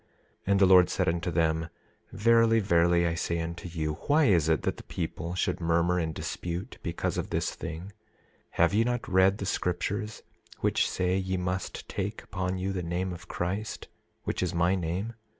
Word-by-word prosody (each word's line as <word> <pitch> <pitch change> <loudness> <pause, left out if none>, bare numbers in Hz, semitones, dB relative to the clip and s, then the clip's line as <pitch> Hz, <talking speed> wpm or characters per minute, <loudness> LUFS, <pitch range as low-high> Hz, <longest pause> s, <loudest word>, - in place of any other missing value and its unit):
27:4 - - -38 0.4
And 100 0 +3
the 100 - +7
Lord 90 -1 +7
said - - 0
unto 85 +1 0
them: 80 0 +1 0.4
Verily, 115 +2 +4
verily, 85 -3 +3
I 85 - +1
say 85 0 -1
unto 85 +2 -5
you, 80 -2 -3
why 150 +1 +5
is 85 - +4
it 80 -3 +2
that - - -1
the - - -10
people 85 +2 -4
should 90 - -1
murmur 85 +2 +2
and 80 -2 -1
dispute 90 +7 -5
because 85 -1 -2
of - - -4
this - - -1
thing? 80 +1 -6
27:5 95 +3 -10 0.6
Have 85 -1 +3
they 110 +3 +3
not 120 0 -2
read 95 +1 +4
the 100 - -4
scriptures, 100 +4 -2 0.4
which - - +2
say 90 0 0
ye 95 -1 -1
must 90 0 -3
take 100 +2 -4
upon 95 0 -3
you 95 +1 -2
the 90 - -2
name 90 +2 -2
of 90 +1 -10
Christ, 95 +5 -3 0.3
which - - -2
is 90 -2 -1
my 85 +2 +3
name? 95 +5 -2
90 Hz, 190 wpm, -28 LUFS, 85-95 Hz, 0.6 s, the